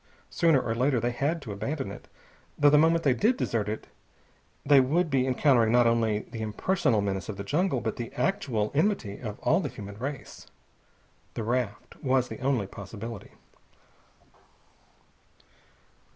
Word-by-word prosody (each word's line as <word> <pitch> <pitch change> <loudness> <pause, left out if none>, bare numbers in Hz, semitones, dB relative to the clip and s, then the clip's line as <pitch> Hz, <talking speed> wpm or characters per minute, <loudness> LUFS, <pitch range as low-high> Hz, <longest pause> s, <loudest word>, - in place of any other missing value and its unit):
Sooner 165 -6 +3
or 115 - -2
later 125 +2 +1
they 120 +2 0
had 145 +6 -1
to 110 - -6
abandon 110 +3 -4
it, - - -11 0.5
though 145 0 +5
the 150 - +6
moment 165 +1 +3
they 135 - +4
did 225 - +2
desert 110 - -1
it 110 - -4 0.8
they 140 -1 +7
would 155 +6 +1
be 130 -1 +2
encountering 125 -3 +3
not 120 0 +5
only 115 -2 +2
the 115 - -6
impersonal 110 - 0
menace 100 0 -3
of 105 - -5
the 100 - -5
jungle, 145 - 0
but 110 -2 -3
the 120 -1 -5
actual 120 - -1
enmity 150 - 0
of 110 -4 -6
all 165 - +3
the - - -3
human 100 0 -9
race. 135 0 -6 0.9
The 115 - -3
raft 115 -2 -3
was 130 -2 +2
the - - -7
only 130 -6 0
possibility. 110 +2 -8
125 Hz, 155 wpm, -27 LUFS, 110-145 Hz, 0.9 s, they